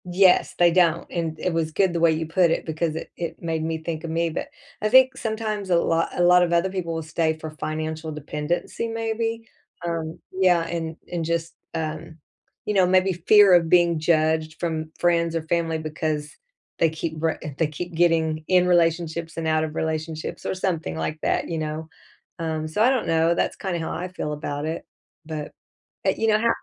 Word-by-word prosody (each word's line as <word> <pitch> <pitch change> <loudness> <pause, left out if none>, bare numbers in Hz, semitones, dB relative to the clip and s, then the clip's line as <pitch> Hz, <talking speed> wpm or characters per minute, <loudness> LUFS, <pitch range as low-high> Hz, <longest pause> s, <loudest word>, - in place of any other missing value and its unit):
Yes, 180 +1 +4
they 175 -1 +5
don't, 170 -1 +3
and 165 -2 -3
it 180 - -1
was 160 -1 -1
good 185 +2 +2
the 170 - 0
way 165 -1 +5
you 160 +1 -1
put 170 +2 +3
it - - -1
because 160 0 -2
it - - -6
it 170 -1 -5
made 165 -2 -2
me 160 0 -1
think 160 -1 -5
of 165 - -4
me, 165 +1 0
but, - - -4 0.3
I 215 - +1
think 260 +2 +6
sometimes 220 -4 -3
a 175 - +4
lot 165 0 +1
a - - +4
lot 180 0 +6
of 175 -1 +2
other 170 +2 +2
people 175 -3 -3
will 160 - -3
stay 160 0 0
for 160 0 -7
financial 155 +1 -4
dependency 150 +8 -3
maybe, 225 0 -2 0.4
um 165 -1 -3
yeah, 185 -2 +3
and 165 -1 -4 0.2
and 175 -2 -2
just, 165 0 -2 0.2
um, 160 0 -4 0.5
you 210 - -1
know, 190 -3 +4
maybe 185 +1 +3
fear 195 +3 +6
of 170 -2 +5
being 170 -2 +4
judged 155 -1 +1
from 160 -2 -3
friends 170 -1 +2
or 165 - -1
family 165 0 0
because 155 -1 -3 0.4
they 165 - +4
keep 160 +1 -4
re 160 -1 +1 0.2
they 160 - +3
keep 170 +4 -6
getting 160 -2 +2
in 180 -1 +4
relationships 165 -1 +1
and 165 - -2
out 155 0 +2
of 155 -1 -4
relationships, 160 0 -3
or - - -1
something 165 - -2
like 155 - -3
that, - - 0
you 165 -1 -3
know? 155 +1 -4 0.5
Um, 160 -1 -2
so, 155 +7 -2
I 245 - +6
don't 260 -3 +1
know, 165 +1 +3
that's - - 0
kind 190 -3 -3
of 170 - -2
how - - -3
I 180 +2 -3
feel 180 -4 -4
about 145 0 -4
it, 160 +1 -3 0.4
but, 155 -2 -5 0.6
uh, - - +6
you 225 - 0
know 215 -1 +4
how 230 +1 +2
165 Hz, 205 wpm, -24 LUFS, 160-180 Hz, 0.6 s, think